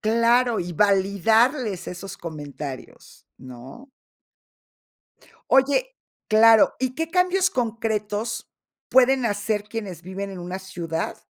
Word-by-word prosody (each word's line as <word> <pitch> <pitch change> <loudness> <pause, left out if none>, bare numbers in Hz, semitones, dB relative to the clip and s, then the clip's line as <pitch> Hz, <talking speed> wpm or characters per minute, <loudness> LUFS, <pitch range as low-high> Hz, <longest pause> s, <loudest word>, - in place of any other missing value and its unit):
Claro, 235 +2 +2
y 175 0 -5
validarles 200 - +2
esos 180 +1 -8
comentarios, 145 -4 -9
¿no? 130 - -12 1.6
Oye 385 - +2 0.3
claro. 220 0 +6
¿Y 255 0 -2
qué 325 +3 -3
cambios 365 +2 +2
concretos 220 - -3 0.4
pueden 260 -1 +4
hacer 205 0 -2
quienes 210 -6 -7
viven 195 +2 -6
en 190 - -8
una 180 +2 -6
ciudad 170 -4 -4
215 Hz, 100 wpm, -23 LUFS, 185-245 Hz, 1.6 s, claro